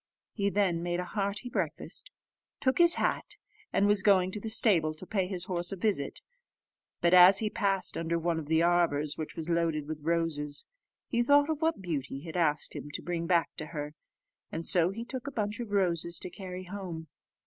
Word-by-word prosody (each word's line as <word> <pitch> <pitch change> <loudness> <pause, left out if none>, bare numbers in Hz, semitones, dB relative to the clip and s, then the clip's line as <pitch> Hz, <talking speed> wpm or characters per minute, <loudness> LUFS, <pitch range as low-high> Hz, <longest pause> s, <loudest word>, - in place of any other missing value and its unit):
He 200 -2 0
then 190 -4 +1
made 175 0 -2
a 180 - -3
hearty 200 +5 -3
breakfast, - - -4 0.5
took 260 +3 +1
his 345 0 +7
hat, - - -1 0.3
and 200 - +2
was 205 -1 +3
going 190 -2 +4
to 210 - -4
the 220 - -5
stable 175 -9 +3
to 170 - -11
pay 190 -2 -1
his 180 -2 -1
horse 175 -2 -2
a - - -3
visit; 185 -8 -2 0.8
but 170 +1 +3
as 180 +2 +9
he 215 0 0
passed 195 -3 +1
under 165 0 -1
one 165 0 -1
of 150 - -8
the 160 +1 +3
arbours, 165 -4 +2
which 155 - -6
was 160 -1 -4
loaded 165 -3 0
with 155 -1 -6
roses, 150 -3 -1 0.4
he 235 - 0
thought 285 +4 +4
of 310 0 -4
what 320 -10 0
Beauty 140 -5 -4
had 160 +1 -9
asked 155 -4 +1
him 145 - -7
to - - -3
bring 170 -1 -3
back 170 -2 +2
to 155 - -5
her, 150 -1 -6 0.6
and 165 +1 -4
so 175 -1 +5
he 225 +5 -6
took 255 +2 -6
a - - -3
bunch 210 -3 -3
of 235 -3 -5
roses 170 -4 0
to 180 - -4
carry 185 -2 -7
home. 180 -4 -7
180 Hz, 205 wpm, -29 LUFS, 165-205 Hz, 0.8 s, as